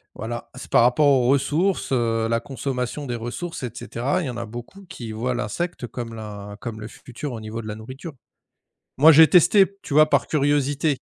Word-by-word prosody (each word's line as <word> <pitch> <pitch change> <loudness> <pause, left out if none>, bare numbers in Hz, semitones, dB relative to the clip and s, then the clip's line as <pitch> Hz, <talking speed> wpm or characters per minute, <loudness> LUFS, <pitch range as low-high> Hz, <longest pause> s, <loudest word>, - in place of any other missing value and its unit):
voilà. 120 +1 -6
C'est 130 - -10
par - - +6
rapport 125 +5 +3
aux 130 -3 +4
ressources, 145 +9 +1
heu, 115 -3 +1
la 115 0 +1
consommation 135 +1 -4
des 120 -3 -3
ressources 125 +8 -5
et 125 - -2
cetera. 135 +7 -2
Il - - -3
y 130 - -3
en 120 - -6
a 120 - -4
beaucoup 120 - -10
qui 125 - -8
voient 120 +4 -2
l'insecte 125 - -3
comme 115 0 -6
la 105 -2 -8
comme 110 -3 -6
le 105 - -6
futur 125 +3 -8
au 115 - -5
niveau 110 +1 -6
de 110 - -9
la 105 - -5
nourriture. 130 +9 -9 0.8
Moi, 155 +4 +8
j'ai 160 +1 +8
testé, 190 +2 +6 0.2
tu 140 - -6
vois, 155 +1 +6
par 140 - +2
curiosité. 145 0 +1
125 Hz, 205 wpm, -23 LUFS, 115-150 Hz, 0.8 s, Moi